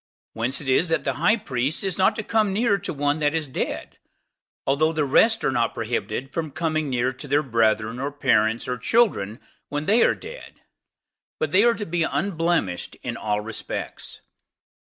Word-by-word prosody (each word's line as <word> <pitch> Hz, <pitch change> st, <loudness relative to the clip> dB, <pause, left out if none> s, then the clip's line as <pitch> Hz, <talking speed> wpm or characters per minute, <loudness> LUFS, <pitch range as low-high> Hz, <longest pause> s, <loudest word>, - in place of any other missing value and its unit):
Whence 120 Hz, +4 st, -1 dB
it 140 Hz, -, -8 dB
is 145 Hz, +6 st, +3 dB
that 165 Hz, -, +1 dB
the -, -, 0 dB
high 220 Hz, -, +4 dB
priest 140 Hz, -, -2 dB
is 190 Hz, -3 st, -1 dB
not 190 Hz, -, +4 dB
to 215 Hz, -, -3 dB
come 215 Hz, -2 st, +1 dB
near 205 Hz, 0 st, +2 dB
to 200 Hz, -, -4 dB
one 145 Hz, 0 st, 0 dB
that 150 Hz, +1 st, +1 dB
is 160 Hz, -2 st, 0 dB
dead, 130 Hz, -, -4 dB, 0.7 s
although 150 Hz, +4 st, +2 dB
the 155 Hz, -2 st, 0 dB
rest 225 Hz, -, +4 dB
are -, -, +2 dB
not 120 Hz, -2 st, 0 dB
prohibited 115 Hz, +3 st, -3 dB
from 160 Hz, -2 st, -2 dB
coming 155 Hz, 0 st, -1 dB
near 125 Hz, 0 st, 0 dB
to 140 Hz, +3 st, -10 dB
their 145 Hz, +2 st, +2 dB
brethren, 115 Hz, -2 st, +1 dB
or 140 Hz, +2 st, -2 dB
parents, 115 Hz, -5 st, +1 dB
or 125 Hz, -1 st, -3 dB
children, 125 Hz, -, +1 dB, 0.3 s
when 145 Hz, +1 st, -3 dB
they 220 Hz, +6 st, +4 dB
are -, -, +3 dB
dead; 485 Hz, +3 st, -10 dB, 0.8 s
but 155 Hz, -, -1 dB
they 190 Hz, +5 st, +5 dB
are 235 Hz, 0 st, +4 dB
to 210 Hz, -, -4 dB
be 175 Hz, -1 st, -1 dB
unblemished 165 Hz, -, -1 dB
in -, -, -3 dB
all 105 Hz, -1 st, -1 dB
respects. 115 Hz, +1 st, -6 dB
145 Hz, 185 wpm, -24 LUFS, 125-175 Hz, 0.8 s, they